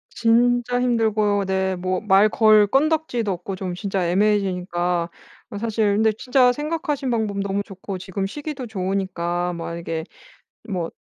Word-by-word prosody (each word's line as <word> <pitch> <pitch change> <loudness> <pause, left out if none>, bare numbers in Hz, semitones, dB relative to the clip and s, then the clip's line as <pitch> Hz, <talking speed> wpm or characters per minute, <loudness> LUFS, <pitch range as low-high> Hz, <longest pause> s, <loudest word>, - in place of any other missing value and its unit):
진짜 245 +1 +2
힘들고 215 -4 +1
네. 190 0 0
뭐 185 +1 -2
말 205 0 +4
걸 215 -2 +5
건더기도 270 -5 +1
없고 180 +2 -5
좀 185 -1 -4
진짜 190 -2 -2
애매해지니까. 180 -3 0 0.4
그 205 - -6
사실 215 -2 +1
근데 220 +1 +3
진짜 250 -1 +3
생각하신 295 -1 -2
방법 220 -4 -1
너무 200 0 -1
좋고 195 0 -7
지금 190 +1 -4
시기도 285 +4 -5
좋으니까 185 -3 -2
만약에 170 -1 -4 0.7
뭐 180 -5 -3
200 Hz, 295 characters per minute, -22 LUFS, 185-230 Hz, 0.7 s, 걸